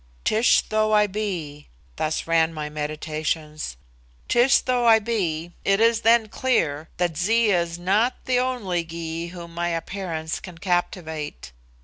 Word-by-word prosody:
"Tish 220 +3 +4
though 215 0 0
I 210 0 +5
be," 180 -8 -4 0.3
thus 155 0 -1
ran 165 0 +2
my 150 -1 -4
meditations 155 - -3 0.5
"Tish 240 +3 +5
though 250 -2 +1
I 225 -1 +8
be, 175 -7 -2
it 195 0 +2
is 230 0 +4
then 230 -1 +4
clear 160 - 0
that 175 -2 0
Zee 220 +5 +3
is 170 -2 0
not 205 +8 +2
the 250 -1 +2
only 225 -9 -1
Gy 165 0 -5
whom 170 -1 -9
my 170 +1 -1
appearance 165 -1 -3
can 180 -3 -10
captivate. 160 - -3
175 Hz, 140 wpm, -24 LUFS, 160-215 Hz, 0.5 s, I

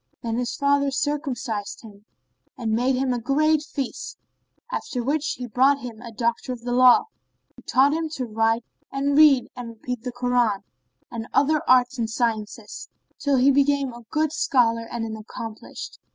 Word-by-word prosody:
Then 230 -1 -2
his 245 -1 -2
father 280 0 +2
circumcised 270 -7 -3
him 210 -2 -14 0.5
and 225 -3 -2
made 250 +4 +2
him 255 0 0
a 245 - -1
great 305 +5 +2
feast; 295 - -5 0.5
after 250 - -3
which 290 +4 0
he 250 - -6
brought 260 +4 +3
him 240 -4 -9
a 235 -1 -9
doctor 235 +3 -1
of 245 -2 -6
the 245 +1 -4
law, 250 +7 +6 0.5
who - - -15
taught 275 +3 +3
him 320 0 -2
to 255 - -3
write 225 +1 0 0.3
and 280 +1 0
read 290 -4 +6
and 245 -2 -6
repeat 230 +1 -6
the 250 +1 -4
Koran, 245 -4 +1 0.5
and 230 -1 -5
other 295 +2 +3
arts 250 0 +4
and 225 -1 -1
sciences, 225 -2 -3 0.3
till 285 -1 +1
he 260 +2 +5
became 280 -1 +2
a 240 - -10
good 310 0 0
scholar 230 - +2
and 235 -1 -3
an 220 -1 -5
accomplished. 220 0 -8
250 Hz, 170 wpm, -24 LUFS, 230-280 Hz, 0.5 s, law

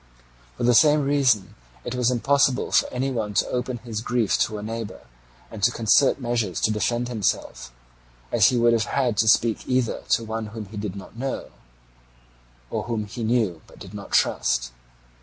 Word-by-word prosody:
For - - -4
the 120 +1 +4
same 150 +4 +5
reason 135 -8 +2 0.3
it - - -4
was 125 -1 +1
impossible 135 +1 +2
for - - +3
any 130 +2 -2
one 110 -5 -3
to - - +2
open 125 0 -2
his 115 -2 -6
grief 120 -3 0
to 110 - 0
a 105 - -7
neighbour 115 -1 -6 0.5
and 110 - -8
to 100 - +5
concert 115 +4 +3
measures 115 - -1
to 110 - +2
defend 120 +3 -1
himself, 110 - -2 0.6
as - - +5
he 125 - +2
would 120 0 +4
have 110 -2 +1
had 125 -3 0
to 110 - +2
speak 115 0 +2
either 125 -3 0
to 115 - +2
one 110 0 -4
whom 110 0 -7
he 105 +2 -10
did 100 -2 -4
not 100 +2 -10
know, 135 +1 -4 1.2
or - - -3
whom 115 -3 -2
he 115 +3 -7
knew 110 -8 0
but - - -17
did - - -11
not - - -8
trust. 60 0 +1
115 Hz, 185 wpm, -24 LUFS, 105-125 Hz, 1.2 s, same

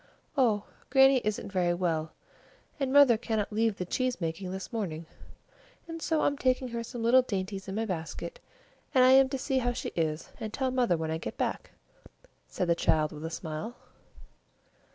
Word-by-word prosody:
"Oh, 225 -7 +3 0.3
Grannie 270 0 +6
isn't 210 -1 -2
very 175 -2 +1
well, 160 -3 -1 0.7
and 270 -2 0
mother 275 -5 +7
cannot 220 -3 -2
leave 220 -1 +1
the 180 - -3
cheese 255 +6 -1
making 170 +2 -3
this 190 +5 -6
morning, 170 -8 -3 0.8
and 330 0 -7
so 320 -1 +1
I'm 285 0 +1
taking 255 0 +1
her 235 0 -4
some 235 0 -6
little 250 +3 +6
dainties 195 -4 -4
in 190 - -4
my 225 +1 -1
basket, 185 - -5 0.6
and 255 - +7
I 255 - +7
am 265 0 +6
to 270 - -2
see 265 0 0
how 245 -1 0
she 245 - -4
is, 160 -1 -2
and 220 - -5
tell 260 +3 -1
mother 245 -9 +2
when 160 0 -3
I 160 - -2
get - - -6
back," - - -2 0.8
said 180 - -2
the 170 - +4
child 155 -2 +1
with 150 0 -9
a - - -3
smile. 165 +7 -5
220 Hz, 185 wpm, -29 LUFS, 175-255 Hz, 0.8 s, mother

